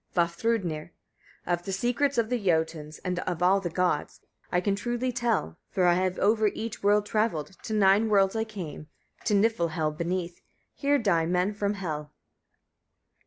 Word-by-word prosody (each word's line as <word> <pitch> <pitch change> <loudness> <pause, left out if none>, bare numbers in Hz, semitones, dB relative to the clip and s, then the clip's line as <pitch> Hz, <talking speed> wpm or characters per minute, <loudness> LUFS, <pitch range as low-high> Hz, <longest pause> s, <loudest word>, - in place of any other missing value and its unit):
Vafthrûdnir. 170 -2 0 0.6
43. 175 - 0
Of 175 0 -2
the 195 - -4
secrets 245 +7 0
of 225 -1 +2
the 245 -4 0
Jötuns 160 -3 0
and 180 -1 -1
of 180 -2 -2
all 190 +2 +5
the 180 -3 -3
gods, 175 -3 -1 0.3
I 180 - +3
can 195 +2 0
truly 240 +4 -2
tell; 230 - -1
for 185 - +1
I 175 - +6
have 185 +1 0
over 215 +1 +3
each 220 +2 -4
world 205 +1 +3
travelled; 205 -7 -1
to 220 - -5
nine 205 +2 +4
worlds 195 -1 +3
I 220 - +1
came, 185 -8 -7 0.4
to 210 - +2
Niflhel 170 -7 +1
beneath: 175 +1 -3 0.3
here 285 0 +2
die 175 -9 +2
men 180 +3 +1
from 205 0 -1
Hel. 155 -6 -4
190 Hz, 165 wpm, -27 LUFS, 170-220 Hz, 0.6 s, I